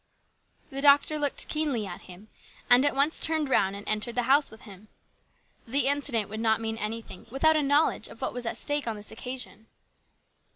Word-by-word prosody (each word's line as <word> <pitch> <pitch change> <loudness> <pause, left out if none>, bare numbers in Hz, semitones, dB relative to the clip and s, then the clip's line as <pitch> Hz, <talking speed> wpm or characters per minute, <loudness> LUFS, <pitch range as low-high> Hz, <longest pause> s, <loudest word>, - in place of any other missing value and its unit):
The 270 0 -4
doctor 285 +2 +4
looked 290 -2 +2
keenly 295 -8 -2
at 175 -2 -8
him, 185 +4 -13 0.4
and 245 +2 +7
at 290 - +1
once 285 +4 +3
turned 315 -3 +1
round 195 -6 +1
and 200 - -9
entered 215 +2 -1
the 245 - 0
house 275 +4 +3
with 220 - -15
him. 200 +1 -14 0.8
The 275 +5 +1
incident 275 -6 +1
would 215 +1 -7
not 220 -1 +1
mean 225 0 -4
anything 220 -2 -6
without 315 +6 +2
a 305 - +2
know 290 +2 +3
ledge - - -4
of - - -14
what - - -3
was 245 -1 -5
at - - -3
stake 290 -3 -1
on 225 - -2
this 210 0 -9
occasion. 225 -2 -8
245 Hz, 200 wpm, -27 LUFS, 220-285 Hz, 0.8 s, and